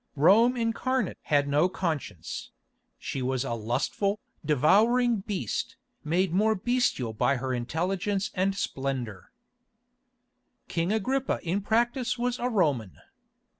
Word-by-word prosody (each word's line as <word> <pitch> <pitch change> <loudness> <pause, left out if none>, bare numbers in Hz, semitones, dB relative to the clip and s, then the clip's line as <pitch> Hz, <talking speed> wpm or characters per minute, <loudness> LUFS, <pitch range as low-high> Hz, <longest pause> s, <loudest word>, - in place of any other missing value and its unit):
Rome 220 - +5
incarnate 245 +3 -1
had 145 -1 +2
no 150 +5 +3
conscience; 155 - -4 0.5
she 135 - -4
was 130 0 0
a 125 - -3
lustful, 130 - -1 0.2
devouring 215 - +4
beast, 190 - -3 0.3
made 175 +3 +1
more 215 +4 +3
bestial 215 - 0
by 140 +5 +2
her 130 0 -2
intelligence 185 - -1
and 195 +1 +1
splendour. 130 - -4 1.4
King 170 +3 -1
Agrippa 255 +5 0
in 180 +4 -1
practice 240 +5 +1
was 245 +1 -1
a 245 - 0
Roman. 145 - 0
185 Hz, 115 wpm, -27 LUFS, 135-225 Hz, 1.4 s, Rome